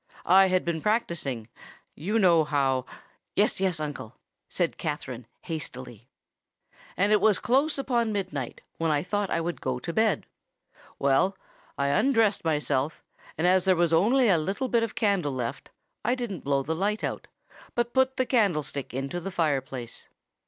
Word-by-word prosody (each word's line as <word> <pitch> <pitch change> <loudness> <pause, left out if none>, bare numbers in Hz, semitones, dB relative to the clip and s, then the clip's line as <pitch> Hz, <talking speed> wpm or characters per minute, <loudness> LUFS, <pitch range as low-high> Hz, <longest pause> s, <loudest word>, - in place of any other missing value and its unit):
I 190 +2 +6
had 185 -1 +1
been 165 -2 -1
practising—you 170 - -3
know 175 -6 +5
how——" 135 -4 0 0.5
"Yes—yes, 185 -4 +1
uncle," 145 -6 -6 0.3
said 175 -2 -1
Katherine, 130 -6 -4 0.2
hastily. 125 - -7 0.9
"And 200 +2 +2
it 210 -2 +4
was 215 -1 +4
close 275 +6 +1
upon 240 -5 0
midnight, 150 - -4 0.2
when 165 0 +1
I 145 -1 +1
thought 205 +1 -1
I - - 0
would 170 +1 -3
go 130 -1 -1
to 170 +7 -5
bed. 220 +1 +2 0.7
Well—I 140 -1 -1
undressed 225 - +2
myself, 150 -2 -1 0.3
and 160 - 0
as 185 +1 +4
there 190 -1 +4
was 170 -1 +2
only 235 +10 +4
a 180 -6 +4
little 200 +11 -2
bit 235 -1 +3
of 230 -1 -3
candle 195 - +1
left, 125 +1 -4 0.3
I 240 +4 +2
didn't 235 - -5
blow 140 -1 +1
the 160 - -2
light 205 +6 -1
out, - - -3 0.5
but 240 0 0
put 260 0 +2
the 255 - +2
candlestick 160 - 0
into 135 +6 -3
the 185 +3 -5
fire 155 -7 +1
place. 125 -3 -8
175 Hz, 155 wpm, -27 LUFS, 140-210 Hz, 0.9 s, I